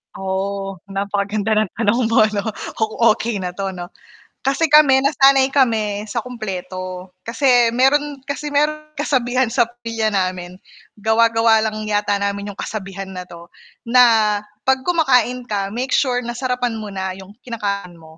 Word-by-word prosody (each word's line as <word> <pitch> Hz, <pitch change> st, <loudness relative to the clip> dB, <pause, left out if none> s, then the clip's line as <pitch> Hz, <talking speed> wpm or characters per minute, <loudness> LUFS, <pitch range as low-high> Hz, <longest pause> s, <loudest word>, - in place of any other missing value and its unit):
Oo 195 Hz, 0 st, -3 dB
napaka-ganda 200 Hz, +2 st, -2 dB
ng 215 Hz, -2 st, +1 dB
tanong 230 Hz, +1 st, +1 dB
mo 225 Hz, -1 st, +4 dB
'no 200 Hz, -1 st, -3 dB, 0.7 s
okey 215 Hz, -2 st, -2 dB
na 180 Hz, -, -3 dB
'to 195 Hz, +1 st, -4 dB
ano 175 Hz, -1 st, -8 dB, 0.5 s
kasi 275 Hz, +4 st, +1 dB
kami 280 Hz, -3 st, +7 dB
nasanay 270 Hz, -2 st, +4 dB
kami 220 Hz, -6 st, +1 dB
sa 220 Hz, -, -5 dB
kumpleto, 185 Hz, -6 st, -6 dB
kasi 245 Hz, +1 st, +3 dB
meron 280 Hz, +3 st, +2 dB
kasi 295 Hz, +1 st, -4 dB
meron 305 Hz, +1 st, 0 dB
kasabihan 255 Hz, -3 st, +1 dB
sa 240 Hz, -2 st, +2 dB
pamilya 230 Hz, -2 st, -3 dB
namin, 185 Hz, -2 st, -2 dB, 0.4 s
gawa-gawa 225 Hz, +1 st, +3 dB
lang 215 Hz, -1 st, -3 dB
yata 205 Hz, -1 st, 0 dB
namin 200 Hz, 0 st, -3 dB
yung 200 Hz, -, -10 dB
kasabihan 195 Hz, -2 st, -6 dB
na 185 Hz, -1 st, -6 dB
'to, 170 Hz, -1 st, -13 dB, 0.4 s
na, 230 Hz, -3 st, +4 dB, 0.3 s
pag 265 Hz, 0 st, +2 dB
kumakain 250 Hz, -8 st, +2 dB
ka, 200 Hz, -4 st, -2 dB
make 250 Hz, +5 st, -3 dB
sure 250 Hz, -3 st, +2 dB
na 240 Hz, -, -4 dB
sarapan 250 Hz, -1 st, -2 dB
mo 215 Hz, -1 st, -6 dB
na 190 Hz, -1 st, -4 dB
yung 195 Hz, +2 st, -13 dB
kinakain 200 Hz, -6 st, -4 dB
mo 160 Hz, -1 st, -16 dB
220 Hz, 150 wpm, -19 LUFS, 195-250 Hz, 0.7 s, kami